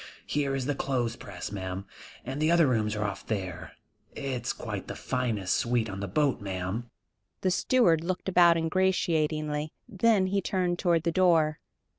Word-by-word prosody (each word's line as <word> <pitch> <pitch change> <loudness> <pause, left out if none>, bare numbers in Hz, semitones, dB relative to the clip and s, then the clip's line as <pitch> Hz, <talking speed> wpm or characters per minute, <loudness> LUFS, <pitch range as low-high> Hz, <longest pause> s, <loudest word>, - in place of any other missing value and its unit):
Here 140 -2 0
is 135 -2 -2
the 145 - 0
clothes 125 -4 -1
press, 95 -2 -7
ma'am, 95 -1 -5 0.4
and 135 +4 -4
the 155 - +3
other 170 -1 +5
rooms 110 -5 +1
are 105 - -1
off 105 - -4
there. 95 -5 -4 0.4
It's 125 -3 -3
quite - - -6
the - - -5
finest 115 -7 -1
suite 120 -4 0
on 95 - -6
the 100 - -3
boat, 135 +5 +1
ma'am." 95 +4 -4 0.5
The 185 - +2
steward 180 -6 +3
looked 185 +2 -3
about 175 -2 +6
ingratiatingly, 155 -3 0
then 215 -2 +3
he 195 +1 0
turned 180 -1 -1
toward 170 -4 +2
the 170 - +1
door. 165 -4 +3
145 Hz, 165 wpm, -28 LUFS, 110-170 Hz, 0.5 s, about